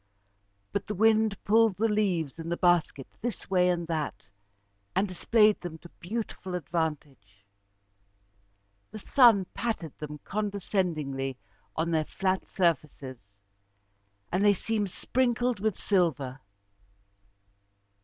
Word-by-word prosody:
But 200 - -3
the 210 - -3
wind 220 0 +3
pulled 220 -2 +4
the 225 +2 +2
leaves 185 -9 0
in 165 0 -5
the 170 - -1
basket 175 -6 +2 0.2
this 240 -4 -5
way 180 -1 +4
and 175 -1 0
that, 155 -10 -4 0.7
and 200 - +2
displayed 210 +3 +3
them 175 -3 -6
to 175 +2 -14
beautiful 190 -2 -5
advantage. 145 - -4 1.4
The 215 - -8
sun 220 -3 +5
patted 205 - -3
them 150 0 -7
condescendingly 175 -10 -2 0.4
on 165 +1 -1
their 160 -1 +1
flat 190 +2 -1
surfaces, 135 - -2 1.0
and 185 +3 +1
they 205 -1 +5
seemed 210 +1 -1
sprinkled 245 +2 0
with 215 -1 -1
silver. 150 -9 0
180 Hz, 115 wpm, -28 LUFS, 155-210 Hz, 1.4 s, sun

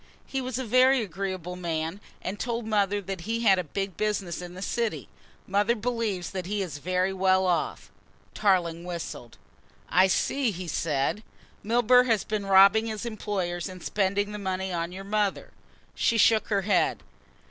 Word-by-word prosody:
He 270 - -3
was 255 -2 -3
a 260 - -3
very 255 +2 +4
agreeable 185 -2 -4
man 165 +1 -3 0.2
and 200 +2 -4
told 235 -1 -2
mother 205 -2 +1
that 190 -2 -5
he 225 +5 -2
had 195 -5 +5
a - - -1
big 195 +3 -4
business 200 -5 -2
in 175 0 -8
the 185 - -8
city. 230 0 -2 0.4
Mother 205 +4 +2
believes 220 -6 -2
that 185 -2 -4
he 205 0 -1
is 155 -6 -6
very 185 +4 0
well 190 0 +3
off." 175 -2 -1 0.4
Tarling 175 -5 +1
whistled. 170 -9 -7 0.5
"I 185 +1 +5
see," 265 +6 +1
he 185 -3 -5
said. 150 +4 -1 0.4
"Milburgh 245 +3 +4
has 225 -4 +2
been 210 -2 -3
robbing 195 +3 +6
his 220 0 -4
employers 195 -5 -3
and 185 -1 -10
spending 205 +1 0
the 210 - -5
money 190 -1 -2
on 170 0 -2
your 190 +2 -7
mother." 205 0 -1 0.4
She 230 - +1
shook 220 0 +4
her 200 -2 0
head. 205 - +1
195 Hz, 170 wpm, -27 LUFS, 180-215 Hz, 0.5 s, robbing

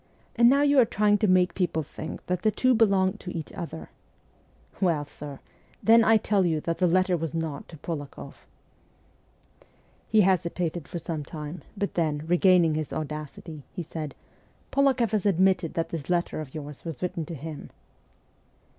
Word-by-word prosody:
And 235 0 +6
now 280 +2 +4
you 285 -1 +5
are - - +8
trying 210 -1 +2
to 215 - +2
make 185 -1 +4
people 175 -4 0
think 155 +2 -8
that 180 0 -1
the 215 - +3
two 255 +5 +2
belong 195 -5 +3
to 180 - -8
each 160 - -7
other! 165 -3 -7 0.9
Well, 165 -6 +2
sir, 145 -1 -9 0.5
then 230 +1 +7
I 225 0 +6
tell 205 -2 +1
you 165 -3 +1
that 165 +1 -2
the 180 - +4
letter 185 +1 +3
was 165 -2 -3
not 160 -3 -4
to 160 - -11
Polak6ff.' 145 -2 -6 1.7
He 215 0 +4
hesitated 175 -3 0
for - - -5
some 160 -2 -4
time, 150 +3 -7 0.2
but 200 0 -2
then, 155 -3 0
regaining 175 -1 +4
his 155 -1 -3
audacity, 155 0 -6
he 180 - -3
said, 155 -2 -6 0.3
' - - -35
Polak6ff 270 -5 +2
has 210 -3 0
admitted 185 -2 +2
that 165 - -1
this 160 -3 -6
letter 175 -3 0
of 145 -2 -10
yours 145 -2 -8
was 165 -1 -6
written 175 -2 -2
to 165 - -6
him.' 155 +1 -8
175 Hz, 170 wpm, -26 LUFS, 155-195 Hz, 1.7 s, are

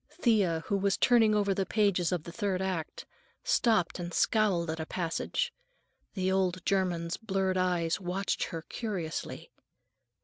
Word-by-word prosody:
Thea, 195 - +2
who 200 - 0
was 195 0 +1
turning 225 -4 +4
over 200 -1 +2
the 195 - 0
pages 190 -3 +1
of 175 -4 -1
the 170 - -8
third 195 -1 -1
act, 185 -4 -3 0.4
stopped 220 -7 +2
and 175 0 -4
scowled 185 -6 +2
at 160 - -5
a 160 - -3
passage. 190 - -2 0.6
The 190 -1 0
old 185 -2 0
German's 175 -3 0
blurred 195 -4 -1
eyes 180 -2 +1
watched 185 +2 -1
her 165 -3 -6
curiously. 185 -9 -5
185 Hz, 145 wpm, -30 LUFS, 170-200 Hz, 0.6 s, turning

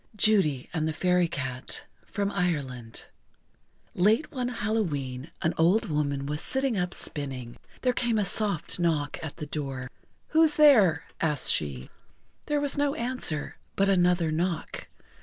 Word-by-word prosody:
JUDY 190 -11 +3
AND 160 -2 0
THE 160 - -1
FAIRY 180 +1 +2
CAT 130 -4 -5 0.2
From 200 -1 -2
Ireland 140 - -3 0.9
Late 215 - +2
one 255 -4 -2
Hallowe'en 170 - -2
an 165 - +2
old 175 +7 +3
woman 140 -2 -1
was 150 +2 -3
sitting 265 -2 0
up 180 -2 -1
spinning. 130 -5 -5 0.3
There 250 -1 +3
came 235 -2 0
a 210 - +1
soft 200 -4 0
knock 155 -4 0
at 160 -2 -7
the 150 - -5
door. 135 -4 -4 0.4
"Who's 315 -1 +4
there?" 215 - +6 0.2
asked 150 -4 +2
she. 70 -4 -1 0.6
There 295 -1 +1
was 285 0 -1
no 285 0 +1
answer, 235 - -2 0.2
but 195 0 +2
another 175 -3 +3
knock. 170 +1 -2
175 Hz, 140 wpm, -27 LUFS, 145-215 Hz, 0.9 s, there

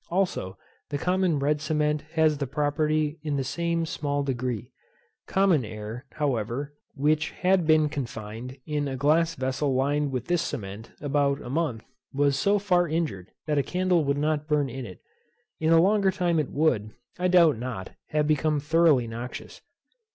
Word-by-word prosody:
Also 175 - -1 0.3
the 145 - -2
common 180 0 +1
red 145 +1 0
cement 150 -1 0
has 155 -3 +3
this 140 -3 -2
property 150 +2 0
in 150 -2 -2
the 135 - 0
same 165 +5 -1
small 145 -2 -2
degree. 125 -4 -3 0.6
Common 190 -8 +3
air, 110 +4 -7
however, 140 0 -2 0.2
which 150 +2 +1
had 185 -2 +1
been 155 -1 +5
confined 125 -3 -6
in 150 -1 -1
a 135 - -3
glass 160 +4 +2
vessel 130 +1 -1
lined 145 +2 +1
with 125 -2 -3
this 175 -1 +1
cement 105 -3 -5
about 140 -1 +1
a 120 - -7
month, 140 -7 -1 0.3
was 140 0 +2
so 200 +9 +2
far 180 -3 +2
injured 150 - -2
that 150 -2 +1
a - - +4
candle 180 +1 +1
would 140 0 0
not 150 0 0
burn 150 -3 +1
in 130 -1 -6
it. 90 - -12 0.6
In 160 0 +2
a 165 - +7
longer 195 +2 +4
time 175 -4 +1
it 150 - -1
would, 130 -9 +1 0.3
I 180 - +2
doubt 170 -8 +5
not, 120 -7 -5 0.2
have 150 -1 +1
become 155 0 +1
thoroughly 150 -3 +3
noxious. 115 +2 -7
150 Hz, 165 wpm, -26 LUFS, 130-160 Hz, 0.6 s, a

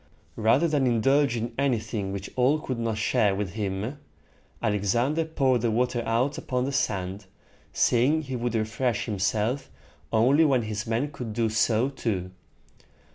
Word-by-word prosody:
Rather 120 +9 +3
than 145 -4 +1
indulge 135 +3 +3
in 115 +1 -3
anything 110 -7 -1
which 100 0 -5
all 130 +5 +3
could 130 -5 -4
not 115 -2 -1
share 105 -2 +2
with 100 -3 -3
him, 105 +6 -3 0.6
Alexander 115 - +1
poured 135 -6 +1
the 120 - +1
water 120 +2 0
out 120 +5 0
upon 125 -1 -2
the 140 - -2
sand, 100 -6 -2 0.4
saying 140 +7 +2
he 130 -2 -5
would 120 -1 -2
refresh 110 +2 -1
himself 110 +5 -1 0.4
only 130 +8 +4
when 135 -6 +3
his 110 +1 -4
men 120 +6 -1
could 120 -6 -6
do 115 0 +1
so 110 +2 +2
too. 100 -9 -3
115 Hz, 150 wpm, -26 LUFS, 110-130 Hz, 0.6 s, only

